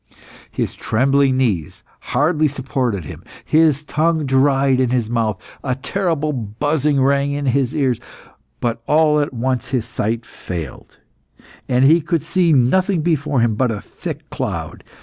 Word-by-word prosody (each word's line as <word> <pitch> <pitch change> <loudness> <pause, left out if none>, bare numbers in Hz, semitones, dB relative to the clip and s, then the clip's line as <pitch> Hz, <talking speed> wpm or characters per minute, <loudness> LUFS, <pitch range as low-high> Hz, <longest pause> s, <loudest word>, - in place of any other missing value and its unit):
His - - -3
trembling 135 +3 +2
knees 105 - -1 0.2
hardly 155 +4 +1
supported 130 - -2
him, - - -9 0.2
his 155 -2 +3
tongue 155 +1 0
dried 135 0 +3
in 130 -2 +2
his 120 -3 -1
mouth, 110 -4 0 0.2
a 130 -2 -1
terrible 155 0 -1
buzzing 140 +6 0
rang 140 +1 +2
in 145 0 -3
his 130 -1 +1
ears. 130 -6 +1 0.6
But 115 -1 -2
all 150 -1 +4
at 145 - -1
once 125 0 -2
his 125 -4 -1
sight 115 0 -2
failed, 85 -7 -8 0.7
and 125 +1 +3
he 160 +4 +5
could 165 -1 -1
see 180 -3 +2
nothing 160 +7 +2
before 150 -5 +1
him 115 -1 +2
but 125 +3 +1
a 110 -2 -3
thick - - -8
cloud. - - -4
135 Hz, 150 wpm, -19 LUFS, 120-150 Hz, 0.7 s, he